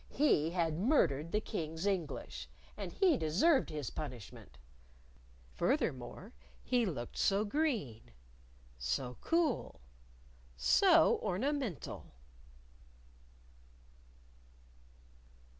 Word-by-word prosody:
He 210 - +2
had 165 -2 -1
murdered 170 - +2
the 210 - +2
King's 165 -5 -4
English, 185 -6 -3 0.3
and - - -6
he 360 -8 +3
deserved 240 - +3
his 150 -5 -4
punishment. 125 -8 -8 0.9
Furthermore, 130 - -2 0.3
he 245 -3 +1
looked 120 -9 -5
so 200 +2 +2
green, 215 - -1 0.7
so 65 - -2
cool, 330 -5 0 0.8
so 60 0 +5
ornamental! 240 - -3
175 Hz, 75 wpm, -34 LUFS, -, 0.9 s, so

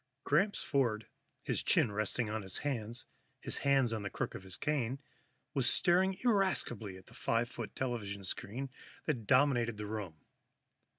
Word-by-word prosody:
_ - - -53
Gramps 195 +8 +2
Ford, 120 -7 +1 0.4
his - - 0
chin 110 - +4
resting 110 +3 0
on 110 +1 -2
his 95 -2 -3
hands, 120 -4 -3 0.3
his - - -2
hands 135 -4 +3
on 110 - -2
the 100 - -3
crook - - -3
of - - -6
his 95 -1 -6
cane, 135 -4 0 0.6
was - - +4
staring 185 +2 +3
irascibly 190 - +1
at 95 - -15
the - - -16
five 115 +1 +1
foot 115 -4 -7
television 105 -6 -3
screen 125 +8 -3 0.3
that 120 -9 -1
dominated 125 -4 +4
the 105 - -4
room. 105 -6 -4
120 Hz, 165 wpm, -34 LUFS, 105-140 Hz, 0.6 s, chin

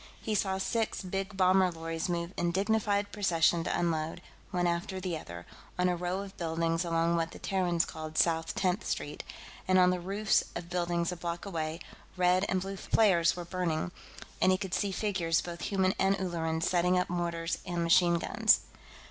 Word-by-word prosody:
He 220 - -3
saw 190 -2 +1
six 220 +2 -1
big 195 +2 -4
bomber 185 0 +4
lorries 165 +1 -4
move 170 +1 -2
in 175 0 0
dignified 205 +1 +1
procession 170 -4 +2
to - - 0
unload, 165 -1 -1 0.3
one 180 -1 0
after 175 +2 -1
the 180 -2 -3
other, 85 - -8 0.3
on 180 0 +2
a 180 - +1
row 180 +2 -2
of 195 -1 -11
buildings 165 0 0
along 165 0 +1
what 165 -1 0
the - - -11
Terrans 180 -3 0
called 155 -1 -7
South 165 -1 +2
Tenth 185 +2 0
Street, - - -4 0.4
and 185 0 +4
on 180 0 +6
the 180 - -1
roofs 200 +4 +1
of 170 0 -6
buildings 175 -1 0
a - - -4
block 170 +1 -4
away, 160 -3 -3 0.4
red 180 +1 +3
and 185 -1 +1
blue 195 +1 -5
flares 175 -6 +3
were 175 -1 -6
burning, 175 -2 -2 0.5
and 185 - +5
he 185 - +3
could 190 -2 -5
see 200 -2 0
figures, 185 -5 0
both 170 -1 -6
human 190 -2 +1
and 195 +1 +3
Ulleran, 165 -3 -2
setting 180 +1 +2
up 180 - +1
mortars 170 -1 -2
and 175 -2 -2
machine 170 +1 +5
guns. 170 - +3
175 Hz, 185 wpm, -30 LUFS, 170-190 Hz, 0.5 s, on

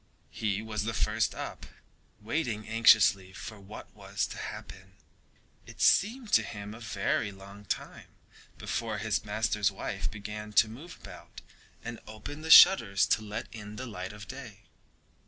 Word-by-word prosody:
He 105 -1 -2
was 105 -2 -3
the 115 -1 -2
first - - 0
up, - - -7 0.5
waiting 110 -2 -2
anxiously 110 -4 +5
for 110 +2 -8
what 100 +2 -11
was - - -2
to - - -8
happen. 95 0 -8 0.7
It - - -13
seemed 225 +3 +3
to 110 - +7
him 105 -1 -7
a 110 - -10
very 110 -1 -1
long 100 +1 -13
time - - -5 0.5
before 115 -3 -3
his 105 0 -1
master's 105 -1 0
wife 80 -5 -4
began 105 +1 -7
to 110 - +6
move 140 +11 -10
about - - -12 0.4
and 120 0 -6
open 110 +8 -8
the 160 - -6
shutters 105 - +8
to - - 0
let 105 -1 -5
in 105 -2 -9
the 130 - -6
light 95 -6 -6
of 105 0 -11
day. 125 -7 -9
105 Hz, 155 wpm, -29 LUFS, 105-115 Hz, 0.7 s, shutters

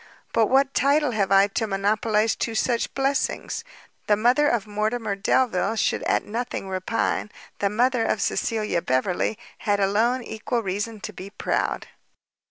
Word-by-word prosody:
But 225 -2 +4
what 270 +2 +3
title 285 +1 +3
have 200 -4 0
I 195 0 +7
to 220 +2 -1
monopolize 210 +2 +1
two 230 - -3
such 235 +1 0
blessings? 275 +10 -1 0.4
the 210 - +5
mother 250 +7 +3
of 230 -5 0
Mortimer 215 0 -1
Delvile 205 0 +1
should - - 0
at - - +2
nothing 230 -2 -4
repine; 190 +3 -1 0.3
the 200 - +1
mother 240 +3 +2
of 220 - 0
Cecilia 210 -2 0
Beverley 175 +11 0 0.2
had 205 -2 0
alone 225 +6 +2
equal 230 +2 -3
reason 205 +3 -3
to - - -6
be 190 +2 -8
proud." 200 - -2
220 Hz, 150 wpm, -24 LUFS, 200-245 Hz, 0.4 s, I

